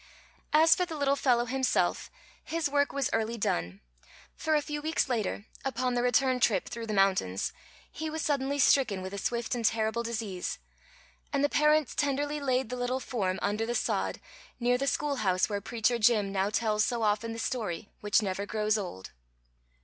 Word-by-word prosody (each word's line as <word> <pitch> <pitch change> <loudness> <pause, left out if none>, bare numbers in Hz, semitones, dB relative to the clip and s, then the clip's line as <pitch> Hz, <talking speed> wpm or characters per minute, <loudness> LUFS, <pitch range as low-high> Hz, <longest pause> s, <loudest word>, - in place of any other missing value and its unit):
As 320 +1 +6
for 365 - 0
the 340 -3 -5
little 280 -1 +2
fellow 245 -4 +2
himself, 260 +2 0 0.3
his 325 -1 -1
work 285 0 +1
was 280 -3 0
early 225 +1 0
done, 90 - -2 0.5
for 315 -1 0
a 300 - +3
few 295 0 -4
weeks 315 0 0
later, 215 -4 -2 0.2
upon 255 -1 -1
the 245 - +1
return 255 +1 +2
trip 210 -6 +2
through 230 -1 -6
the - - -3
mountains, 190 - +1 0.4
he 315 0 -4
was 315 +1 -3
suddenly 280 -1 0
stricken 255 -8 +3
with 190 +1 -6
a 200 - -4
swift 235 +2 -2
and 240 -2 -2
terrible 220 +1 +1
disease, 225 -6 -3 0.7
and 280 -1 +1
the 290 - +3
parents 300 -1 +3
tenderly 290 +1 0
laid 260 -4 0
the - - -2
little 245 +1 -1
form 195 -8 -2
under 210 +2 0
the 240 - -1
sod - - -1 0.4
near 245 0 +2
the 275 +2 -1
schoolhouse 215 -13 +1
where 205 -1 -2
Preacher 235 +2 0
Jim 215 -3 +3
now 195 0 0
tells 215 0 +1
so 235 -1 -1
often 215 +2 +1
the 225 - -6
story, 210 -6 -3
which 210 +1 +2
never 200 +1 -2
grows 215 0 +1
old. 135 - -7
235 Hz, 180 wpm, -29 LUFS, 210-275 Hz, 0.7 s, As